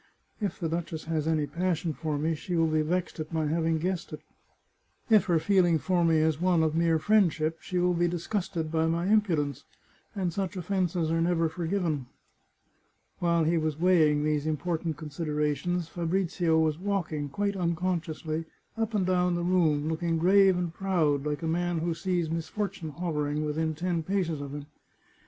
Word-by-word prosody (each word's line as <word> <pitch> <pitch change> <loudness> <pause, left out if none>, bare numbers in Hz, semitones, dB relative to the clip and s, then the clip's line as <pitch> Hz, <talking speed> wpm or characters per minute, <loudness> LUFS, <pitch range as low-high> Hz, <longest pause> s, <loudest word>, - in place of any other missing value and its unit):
If 205 - -2
the 170 - -1
duchess 165 -1 -3
has 160 -1 -2
any 155 -2 +1
passion 170 0 -1
for 155 -1 -3
me, 160 +3 0
she 175 +3 -4
will 165 -1 +3
be 155 -1 +1
vexed 175 +2 -2
at 155 +1 -5
my 160 -1 0
having 160 +1 +1
guessed 175 +2 -2
it. 155 - -7 0.9
If 215 -2 +6
her 175 -3 +3
feeling 175 0 +3
for 175 +3 +1
me 165 -1 +4
is 155 0 +1
one 180 -3 +3
of 155 -1 +1
mere 165 0 +3
friendship 165 -4 +2
she 180 - -4
will 180 0 +3
be 175 0 +2
disgusted 175 -1 -3
by 160 0 +1
my 170 +2 0
impudence, 165 - +1 0.5
and 185 -4 -1
such 195 +1 -3
offences 180 -3 -1
are 165 0 +1
never 165 -1 +2
forgiven." 165 -5 -2 1.1
While 170 -1 +2
he 165 +1 +2
was 155 -1 -2
weighing 160 -5 +4
these 150 0 0
important 160 0 -2
considerations 150 +2 -2
Fabrizio 170 -1 0
was 160 -1 +1
walking, 175 -7 -2
quite 200 +7 -1
unconsciously, 170 -3 -2 0.3
up 225 -1 -2
and 195 -3 +2
down 180 -1 +2
the 175 - -2
room, 160 -5 +2
looking 165 +1 0
grave 190 +2 +5
and 175 -2 -2
proud, 160 -7 +1
like 150 +2 -3
a - - -1
man 175 +1 0
who 165 +1 -1
sees 175 0 -1
mis 165 +1 -3
fortune 200 -6 -4
hovering 150 -2 -2
within 160 +1 -1
ten 170 +1 -1
paces 170 -3 -1
of 140 0 -6
him. 145 -1 -6
165 Hz, 175 wpm, -28 LUFS, 155-180 Hz, 1.1 s, If